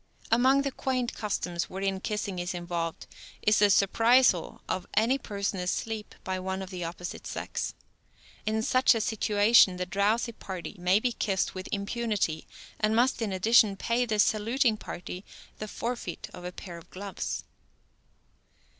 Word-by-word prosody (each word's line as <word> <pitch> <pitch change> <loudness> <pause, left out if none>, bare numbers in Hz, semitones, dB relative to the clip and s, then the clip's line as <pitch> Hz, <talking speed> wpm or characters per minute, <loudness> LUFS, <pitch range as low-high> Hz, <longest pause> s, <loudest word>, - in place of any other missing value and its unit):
Among 260 +4 +5
the 275 - -1
quaint 255 -2 -1
customs 180 -5 -2
wherein 195 0 -2
kissing 200 -2 -3
is 175 +1 -3
involved 170 -1 -3 0.4
is 210 +1 +4
the 205 - +6
surprisal 225 -1 +4
of 185 - -2
any 235 +6 +3
person 200 -4 -3
asleep 210 +4 -3
by 185 0 -2
one 190 +1 -3
of 190 - -9
the 180 -2 -4
opposite 170 +1 -6
sex. - - -4 0.7
In 220 +1 0
such 255 +1 +4
a - - +1
situation 210 -2 +4
the 180 - -2
drowsy 205 +6 +1
party 190 -3 -7
may 180 +3 +4
be 245 +2 0
kissed 195 -5 -1
with 185 0 -6
impunity, 200 -5 -1 0.3
and 215 +1 +2
must, 245 +1 +3
in 215 -3 -1
addition, 200 +1 +4
pay 240 +4 0
the 215 -2 0
saluting 225 +3 +3
party 180 -1 -7 0.4
the 215 - -4
forfeit 235 -5 -4
of 180 - -9
a 180 - -4
pair 175 -2 -9
of 165 - -18
gloves. 195 +1 -4
205 Hz, 155 wpm, -28 LUFS, 185-230 Hz, 0.7 s, the